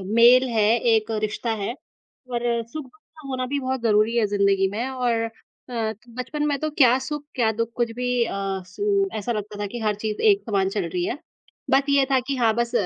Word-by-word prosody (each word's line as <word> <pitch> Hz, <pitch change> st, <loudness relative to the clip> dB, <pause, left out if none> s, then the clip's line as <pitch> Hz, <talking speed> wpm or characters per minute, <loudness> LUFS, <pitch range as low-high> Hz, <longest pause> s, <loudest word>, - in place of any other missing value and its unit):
Mail 245 Hz, +3 st, +7 dB
है, 220 Hz, -2 st, +2 dB, 0.2 s
एक 225 Hz, -1 st, +2 dB
रिश्ता 215 Hz, +2 st, -2 dB
है 215 Hz, -, -2 dB, 0.6 s
और 240 Hz, -1 st, -1 dB, 0.3 s
सुख-दुःख 300 Hz, +3 st, -9 dB, 0.2 s
का 305 Hz, -3 st, -11 dB
होना 260 Hz, -1 st, -2 dB
भी 285 Hz, -, +1 dB
बहुत 260 Hz, -1 st, -2 dB
ज़रूरी 215 Hz, +1 st, +3 dB
है 230 Hz, -, +3 dB
ज़िंदगी 200 Hz, -1 st, +2 dB
में 230 Hz, +5 st, -2 dB
और 250 Hz, -2 st, 0 dB
अ, 225 Hz, -, -6 dB, 0.6 s
तो 225 Hz, +3 st, -20 dB
बचपन 295 Hz, +4 st, -3 dB
में 290 Hz, -1 st, +1 dB
तो 310 Hz, -, -1 dB
क्या 260 Hz, -5 st, +5 dB
सुख? 295 Hz, -1 st, -4 dB
क्या 230 Hz, -4 st, +2 dB
दुःख? 230 Hz, 0 st, 0 dB
कुछ 240 Hz, -1 st, 0 dB
भी 250 Hz, -, -1 dB, 0.2 s
अ, -, -, -4 dB, 0.3 s
सु 400 Hz, -, 0 dB
ऐसा 210 Hz, +3 st, -3 dB
लगता 210 Hz, -2 st, -4 dB
था 205 Hz, -, -1 dB
कि -, -, -3 dB
हर 210 Hz, -, +1 dB
चीज़ 215 Hz, -1 st, -2 dB
एक 400 Hz, 0 st, 0 dB
समान 195 Hz, -2 st, +1 dB
चल 195 Hz, -, 0 dB
रही 175 Hz, +1 st, -1 dB
है। 250 Hz, -, -2 dB, 0.5 s
बाकी 280 Hz, +1 st, +3 dB
ये 275 Hz, -, +5 dB
था 265 Hz, -, +5 dB
कि 280 Hz, -, -1 dB
हाँ, 230 Hz, -2 st, +3 dB
बस 235 Hz, 0 st, 0 dB
235 Hz, 215 wpm, -24 LUFS, 215-265 Hz, 0.6 s, Mail